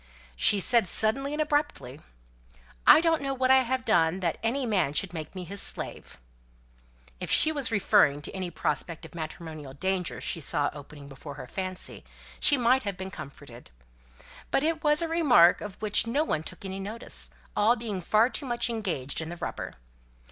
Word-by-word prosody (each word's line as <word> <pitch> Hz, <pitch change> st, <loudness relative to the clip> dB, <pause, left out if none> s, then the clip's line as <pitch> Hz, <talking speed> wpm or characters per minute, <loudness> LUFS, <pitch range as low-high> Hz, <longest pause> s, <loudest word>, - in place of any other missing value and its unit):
She 200 Hz, -, +5 dB
said 230 Hz, 0 st, +3 dB
suddenly 270 Hz, +9 st, 0 dB
and 300 Hz, -, -4 dB
abruptly, 290 Hz, -, -1 dB, 0.9 s
"I -, -, +9 dB
don't 330 Hz, -2 st, +2 dB
know 275 Hz, -1 st, -2 dB
what 260 Hz, 0 st, +2 dB
I 265 Hz, -, +8 dB
have 255 Hz, +1 st, -2 dB
done 170 Hz, -4 st, +2 dB
that 170 Hz, -3 st, -1 dB
any 250 Hz, +5 st, -1 dB
man 190 Hz, -, +1 dB
should 180 Hz, +3 st, -1 dB
make 160 Hz, +1 st, -7 dB
me 185 Hz, -, -5 dB
his 195 Hz, +3 st, -4 dB
slave." -, -, -6 dB, 1.0 s
If -, -, -5 dB
she 315 Hz, -, +7 dB
was 285 Hz, -5 st, +2 dB
referring 195 Hz, -8 st, +3 dB
to -, -, -5 dB
any 185 Hz, -2 st, -4 dB
prospect 170 Hz, -1 st, -2 dB
of -, -, -13 dB
matrimonial 155 Hz, -3 st, -7 dB
danger 185 Hz, +4 st, -2 dB
she -, -, -2 dB
saw 145 Hz, -1 st, -1 dB
opening 145 Hz, 0 st, -11 dB
before 140 Hz, +1 st, -10 dB
her 135 Hz, -, -8 dB
fancy, 185 Hz, +6 st, -5 dB, 0.4 s
she 290 Hz, -, +6 dB
might 250 Hz, +2 st, +3 dB
have 200 Hz, -5 st, -4 dB
been 190 Hz, 0 st, -6 dB
comforted. 135 Hz, -6 st, -11 dB, 0.8 s
But 270 Hz, -, +1 dB
it 320 Hz, +1 st, -1 dB
was 300 Hz, +1 st, +3 dB
a -, -, -1 dB
remark 275 Hz, -, +5 dB
of 205 Hz, -2 st, -8 dB
which 215 Hz, +1 st, +1 dB
no 280 Hz, +7 st, +1 dB
one 155 Hz, -, -1 dB
took 160 Hz, -, -9 dB
any 190 Hz, 0 st, -5 dB
notice, 215 Hz, +4 st, -4 dB, 0.3 s
all 220 Hz, +3 st, +4 dB
being 220 Hz, -6 st, -5 dB
far 215 Hz, +6 st, +3 dB
too 285 Hz, -, -3 dB
much 240 Hz, 0 st, -1 dB
engaged 170 Hz, -, -3 dB
in 160 Hz, -, -6 dB
the 175 Hz, -, -7 dB
rubber. -, -, -5 dB
200 Hz, 185 wpm, -27 LUFS, 165-255 Hz, 1.0 s, I